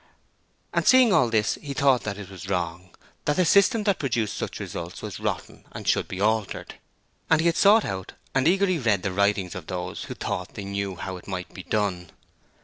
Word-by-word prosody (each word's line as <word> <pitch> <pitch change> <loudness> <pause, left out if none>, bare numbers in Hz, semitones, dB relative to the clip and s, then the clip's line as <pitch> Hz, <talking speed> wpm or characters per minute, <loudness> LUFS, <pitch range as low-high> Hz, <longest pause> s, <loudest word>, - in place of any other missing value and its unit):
And - - 0
seeing 255 -5 +7
all 125 -7 +4
this 110 -3 +1
he 140 -2 -6
thought 135 -3 +4
that 105 -2 -3
it 100 -2 -8
was 95 0 -9
wrong, 90 -1 -2 0.4
that 150 - +2
the 180 - +3
system 200 +5 +4
that 200 -3 +1
produced 115 -8 -1
such - - -4
results - - -6
was - - -6
rotten - - -4
and - - -7
should - - +2
be 95 - -6
altered. 110 0 0 0.6
And 160 - +5
he 160 - +1
had 170 -1 +3
sought 210 +2 +6
out 95 -1 -5 0.2
and 135 +2 +2
eagerly 185 -1 +3
read 105 -7 +1
the 95 -1 -1
writings 100 -1 +1
of 90 -4 -8
those 90 -1 -4
who - - -7
thought - - -4
they 100 - -6
knew 100 -1 -3
how 95 +1 -5
it 90 - -14
might 90 -2 -5
be 95 - -7
done. 90 -4 -1
105 Hz, 210 wpm, -25 LUFS, 95-150 Hz, 0.6 s, seeing